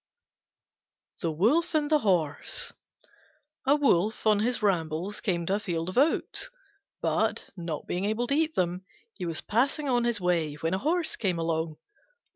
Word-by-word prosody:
THE 165 - 0
WOLF 235 - +2
AND 300 0 +1
THE 305 - +5
HORSE 175 - 0 0.9
A 280 - +6
Wolf 220 - +2
on 215 -1 +5
his 235 +1 0
rambles 180 0 0
came 175 -5 0
to 190 - 0
a 205 - +1
field 170 -4 -2
of 185 - -6
oats, 305 - +1 0.5
but, - - 0
not 170 -4 -5
being 180 +2 -2
able 220 +3 0
to 275 - -1
eat 315 +1 +1
them, 180 0 0 0.3
he 180 - -5
was 165 -1 -3
passing 275 +6 +1
on 245 -2 +2
his 235 -3 0
way 170 -5 +1
when 165 +3 -2
a 190 - +1
Horse 330 - +1
came 185 -5 0
along. 165 -1 -1
195 Hz, 165 wpm, -28 LUFS, 170-250 Hz, 0.9 s, A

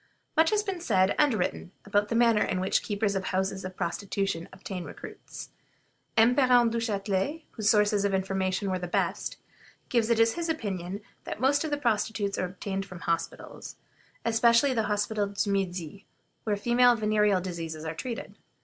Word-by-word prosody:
Much 320 0 +5
has 420 -1 +1
been 385 -4 -4
said 190 - +3
and 290 -6 +4
written 180 - -2
about 205 0 +1
the 230 - -2
manner 230 -2 +4
in 185 - 0
which 185 +1 +1
the - - -12
keepers 205 -1 0
of 190 -1 -2
houses 190 +1 -1
of 185 0 -7
prostitution 195 -1 -2
obtain 185 -1 -6
recruits. - - -9 0.7
M. 230 +2 +6
Parent 245 -4 +5
Duchatelet, 225 +5 -1
whose 215 -2 0
sources 210 -1 +3
of 200 - +1
information 190 0 -1
were 185 - -1
the 180 - -4
best, - - -1 0.5
gives 235 -2 +2
it 230 -1 +3
as 225 0 +5
his 340 -1 -3
opinion 200 - -3 0.2
that - - -5
most 280 +4 +3
of 315 - -2
the 290 - 0
prostitutes 210 -5 0
are - - +1
obtained 195 +1 -4
from 185 -2 -10
the 175 - -11
hospitals, 165 0 -4 0.5
especially 235 +3 +4
the 225 -3 0
Hospital 210 0 0
du 200 0 -1
Midi, 190 -1 -3 0.4
where 210 -2 0
female 240 +3 +4
venereal 210 -3 +2
diseases 165 -3 -5
are 160 - -3
treated. 235 +8 -6
205 Hz, 175 wpm, -28 LUFS, 190-235 Hz, 0.7 s, M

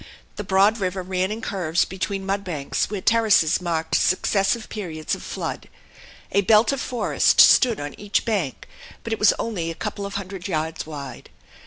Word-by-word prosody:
The 205 - -5
broad 200 +3 +3
river 185 -1 -2
ran 185 +1 -1
in 220 +2 -5
curves 180 -6 0
between 195 +1 -4
mud 195 +1 -1
banks 155 -7 -2
where 205 -2 -4
terraces 215 -8 +3
marked 165 -2 -2
successive 195 +4 +1
periods 165 -7 -5
of - - -3
flood. - - -6 0.6
A 200 - +3
belt 215 +2 +4
of 275 -1 -3
forest 245 -3 +1
stood 240 -5 +6
on 145 0 -5
each 205 0 -1
bank, 195 - -2 0.4
but 230 - -3
it - - -3
was 210 - +6
only 185 -8 -3
a 165 - -5
couple 200 +4 -4
of 200 - -9
hundred 190 -2 -5
yards 160 -3 -3
wide. 145 -3 -8
195 Hz, 175 wpm, -23 LUFS, 170-210 Hz, 0.6 s, stood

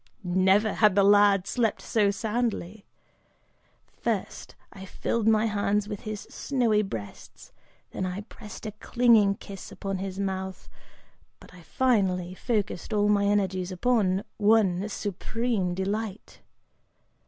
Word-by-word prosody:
Never 190 +4 +3
had 210 -3 +4
the 200 - +5
lad 200 -1 +5
slept 225 0 0
so 210 -3 +1
soundly! 215 -1 -3 1.1
First - - -3 0.2
I 190 - -10
filled 220 +3 -2
my 220 0 +4
hands 205 -1 0
with 205 -2 -5
his 215 -1 -6
snowy 235 -6 0
breasts, 115 - -8 0.4
then 185 - -3
I 185 +2 -4
pressed 210 0 -11
a 215 - -3
clinging 215 -2 +3
kiss 195 -1 -10
upon 195 -1 -4
his 190 0 -5
mouth, 190 -1 -4 0.7
but - - -16
I 180 - -14
finally 185 -5 0
focused 210 -1 -2
all 210 0 +2
my 200 -1 +3
energies 190 -2 0
upon 195 -1 +1 0.2
one 205 -2 +3
supreme 205 -1 -2
delight! 200 +2 -4
205 Hz, 125 wpm, -27 LUFS, 190-215 Hz, 1.1 s, the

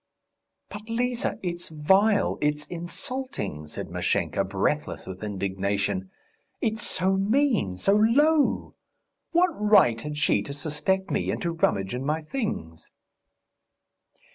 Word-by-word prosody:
"But, 210 +2 -9
Liza, 245 +1 -1
it's 175 -1 -4
vile... 190 +8 +3
it's 150 0 0
insulting," 175 - -4
said - - -7
Mashenka, - - 0
breathless - - -1
with 95 +2 -8
indignation. 100 -1 -2 0.5
"It's 220 -1 -1
so 190 +1 +1
mean, 210 - +1
so 195 - +2
low! 280 +9 +3 0.6
What 355 +2 +4
right 205 - +4
had 150 +2 -5
she 150 - +2
to 140 - -6
suspect 160 +6 -1
me - - 0
and - - -1
to 170 - 0
rummage 100 -12 0
in 125 +1 -3
my 155 +3 -1
things?" 155 - -4
175 Hz, 120 wpm, -26 LUFS, -, 0.6 s, What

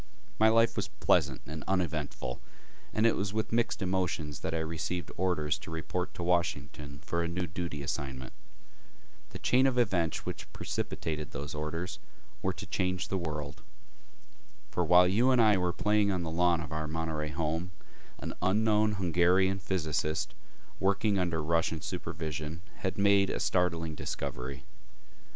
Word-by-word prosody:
My 110 +1 +7
life 115 +1 +4
was 100 -2 -1
pleasant - - +2
and 75 0 -6
uneventful, 80 -9 -1 0.5
and 110 - +2
it 115 - +5
was 100 0 -2
with 110 0 -1
mixed 115 -3 +1
emotions 85 -6 -1
that 80 - -3
I 80 - 0
received 80 +1 -3
orders 80 -5 +1
to - - -9
report 80 +3 -3
to 85 - -4
Washington 75 -5 -1
for 85 - 0
a 85 - 0
new 90 +1 -2
duty 85 -3 -4
assignment. 65 -2 -4 1.0
The - - -7
chain 130 +2 +4
of 130 -2 +1
events 90 -9 +1
which - - -6
precipitated 75 -2 -3
those 70 +1 -5
orders 80 +4 -4 0.4
were - - +1
to - - -7
change 90 -1 -1
the 95 - 0
world.... 75 -4 -4 1.1
For 90 - +1
while 90 +2 +7
you 115 +8 +3
and 130 -2 +5
I 110 -3 +6
were 90 -1 +1
playing 105 +2 +2
on 90 -2 0
the 80 - -3
lawn 85 0 +3
of 75 -2 -7
our 80 0 -2
Monterey 80 -1 -2
home, 80 +3 -1 0.5
an - - -5
unknown 105 +2 +3
Hungarian 95 +1 +3
physicist 80 -4 -1 0.5
working 100 +1 +2
under 85 -4 0
Russian 80 0 +1
supervision 80 +1 -4
had 95 - -2
made 100 -1 +5
a - - -1
startling 85 -3 +1
discovery. 65 -2 -4
85 Hz, 155 wpm, -31 LUFS, 75-95 Hz, 1.1 s, My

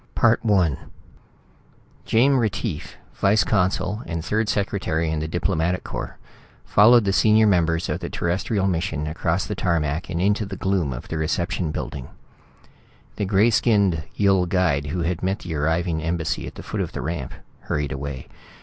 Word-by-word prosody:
I 115 -1 +5 1.7
Jame 130 +4 +4
Retief, 105 -6 -3 0.2
vice 100 +2 +3
consul 100 +1 0
and 80 0 -4
third 110 +2 0
secretary 90 -6 -1
in 80 - -1
the 80 - -3
Diplomatic 90 +1 -1
Corps, - - -6 0.5
followed 115 +2 +6
the 95 - +1
senior 110 +1 +5
members 85 -4 +2
of - - -2
the - - -5
terrestrial 95 +4 -1
mission 85 -5 -1
across 80 +3 -1
the 105 - -4
tarmac 85 -4 -1
and 85 - -2
into 100 +4 +2
the 95 -1 -6
gloom 95 -7 0
of - - -7
the 80 - -3
reception 85 +2 -1
building. 70 -4 -5 1.1
The 105 - -1
gray 100 +4 +3
skinned 100 -7 +2
Yill 95 -3 +3
guide 85 -6 +1
who 85 +4 -2
had 85 0 -2
met 95 +2 0
the 85 - -5
arriving 80 +2 0
embassy 80 0 -2
at - - -9
the - - -9
foot - - -3
of - - -4
the - - -4
ramp 80 -5 -4 0.3
hurried 75 -1 -2
away. 65 -2 -5
90 Hz, 160 wpm, -23 LUFS, 80-100 Hz, 1.7 s, followed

